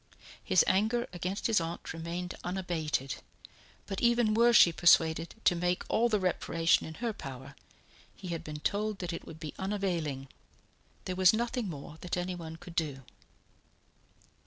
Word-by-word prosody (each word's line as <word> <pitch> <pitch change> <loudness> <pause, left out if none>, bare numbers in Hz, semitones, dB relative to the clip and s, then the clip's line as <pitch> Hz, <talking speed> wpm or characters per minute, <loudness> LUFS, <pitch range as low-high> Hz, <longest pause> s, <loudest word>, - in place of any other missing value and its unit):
His 185 - +4
anger 220 +5 +2
against 180 +3 -3
his 220 -6 +3
aunt 165 0 -5
remained 170 +2 -4
unabated; 170 -7 -2 0.7
but 195 -1 -4
even 235 -2 +3
were 235 +2 +5
she 175 -7 +7
persuaded 165 -1 +4
to - - +5
make 180 +1 0
all 235 +2 +3
the 210 -2 +2
reparation 165 -3 +1
in 160 - -8
her 230 +2 -2
power, 135 -3 -9 0.6
he 185 - -8
had 165 -1 -3
been 150 -2 -7
told 210 +3 -1
that 180 -2 -4
it 165 - -7
would 160 - -10
be 155 -2 -6
unavailing; 175 -9 -2 0.8
there 185 - -3
was 185 +1 +6
nothing 235 -1 -1
more 150 0 -8
that 180 0 -3
anyone 175 -3 -4
could 165 +1 -11
do. 145 -5 -2
180 Hz, 155 wpm, -31 LUFS, 160-200 Hz, 0.8 s, she